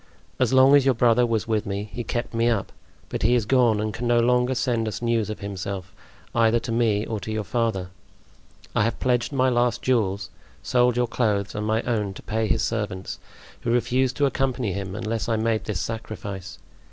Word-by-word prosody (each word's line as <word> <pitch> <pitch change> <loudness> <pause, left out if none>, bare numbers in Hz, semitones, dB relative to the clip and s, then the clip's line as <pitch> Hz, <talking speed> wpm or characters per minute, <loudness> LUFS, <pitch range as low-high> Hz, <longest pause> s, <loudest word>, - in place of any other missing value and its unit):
As 125 -3 +2
long 130 +2 +7
as 140 - +5
your 135 -1 +3
brother 120 +1 +4
was 110 -2 -1
with 110 -3 0
me 100 +1 -3
he 120 - -4
kept 120 +2 -3
me 115 +1 +2
up; 110 -4 -1 0.4
but - - -4
he 120 +3 +3
is 120 -4 +1
gone 120 -3 +3
and 105 0 -2
can 120 +1 -3
no 120 0 +4
longer 125 +2 +2
send 120 -3 0
us 110 - -3
news 115 -3 0
of 110 - -6
himself, 100 -1 -5 0.4
either 115 0 +3
to 120 - -5
me 115 -2 +1
or 110 -2 -3
to 105 +3 -6
your 110 0 -2
father. 110 -4 -1 0.9
I - - +3
have 115 +1 -1
pledged 125 0 +1
my 130 -2 +2
last 120 -2 +1
jewels, 100 -6 0 0.3
sold 125 -1 +2
your 125 - +3
clothes 105 -4 0
and 105 0 -3
my 110 +2 +1
own 105 -5 -1
to - - -10
pay 110 0 -1
his - - +1
servants, 105 -4 -3 0.4
who - - -4
refused 125 +2 +1
to 145 - +3
accompany 130 -6 0
him 95 -1 -4
unless 115 +1 -3
I 115 - +2
made 110 0 0
this 105 -5 -2
sacrifice. 100 -2 -6
115 Hz, 205 wpm, -24 LUFS, 105-120 Hz, 0.9 s, long